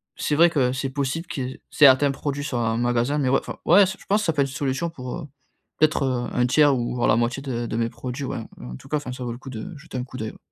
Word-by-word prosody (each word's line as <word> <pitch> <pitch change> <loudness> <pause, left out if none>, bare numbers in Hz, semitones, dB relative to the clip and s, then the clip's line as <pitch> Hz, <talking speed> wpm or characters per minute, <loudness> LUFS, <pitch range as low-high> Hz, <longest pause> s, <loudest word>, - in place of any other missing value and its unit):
c'est 150 - -1
vrai 170 +2 +6
que 130 -6 +1
c'est 130 +1 -2
possible, 140 +5 -2
qu'il 130 -2 -3
y - - -11
certains 140 -1 +6
produits 145 +1 -3
soient 120 -5 -1
un 115 - 0
magasin, 120 +4 +1
mais, 135 -3 +1
ouais, 135 - +4
enfin - - -8
ouais, 195 +4 +7
je 190 +2 -4
pense 210 +2 +2
ça 165 - +2
peut 145 - +1
être - - -2
une 135 - -9
solution 145 +4 -1
pour, 125 -6 -6
heu, 150 - -7 0.5
peut-être, 130 -5 +1
1/3 135 +3 +4
ou 120 0 -2
voire 120 - +1
la 110 - +5
moitié 120 +3 -1
de 120 -3 -3
de 110 - -4
mes 115 0 0
produits, 125 +4 -5
ouais. 125 - -3 0.2
En 60 0 -7
tout - - -15
cas, 150 - +1
enfin, 145 -4 -6
ça 125 0 -6
vaut 120 - -3
le - - -8
coup 135 - -10
de 150 - -7
jeter 140 -3 -8
un 125 - -2
coup 130 - -10
d'oeil, 110 0 -4
ouais. - - -16
130 Hz, 285 wpm, -24 LUFS, 120-150 Hz, 0.5 s, ouais